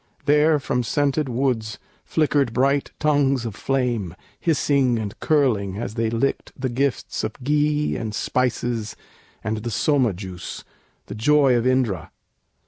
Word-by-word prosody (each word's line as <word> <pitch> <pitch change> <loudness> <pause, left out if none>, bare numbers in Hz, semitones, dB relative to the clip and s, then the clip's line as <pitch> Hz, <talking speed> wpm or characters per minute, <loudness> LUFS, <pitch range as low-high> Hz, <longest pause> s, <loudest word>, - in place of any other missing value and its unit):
There 150 +1 +4
From 135 -3 -1
scented 145 +3 0
woods 120 -3 -1 0.3
flickered 145 -6 +1
bright 140 +3 +2
tongues 140 -4 +2
of 115 - -4
flame, 120 -8 -1 0.2
Hissing 140 -6 +2
and 105 -3 -4
curling 110 -11 +1
as 110 -1 -4
they 115 0 0
licked 115 +4 -1
the 130 0 -1
gifts 135 +2 -1
Of 110 - -2
ghee 150 +1 +1
and 110 -2 -4
spices 120 -3 -1 0.5
and 110 +1 -1
the 115 +2 -4
Soma 125 0 +2
juice, 90 -1 -7 0.4
The - - -7
joy 140 +2 +4
of 120 +1 +1
Indra. 120 -10 0
125 Hz, 135 wpm, -23 LUFS, 110-145 Hz, 0.5 s, There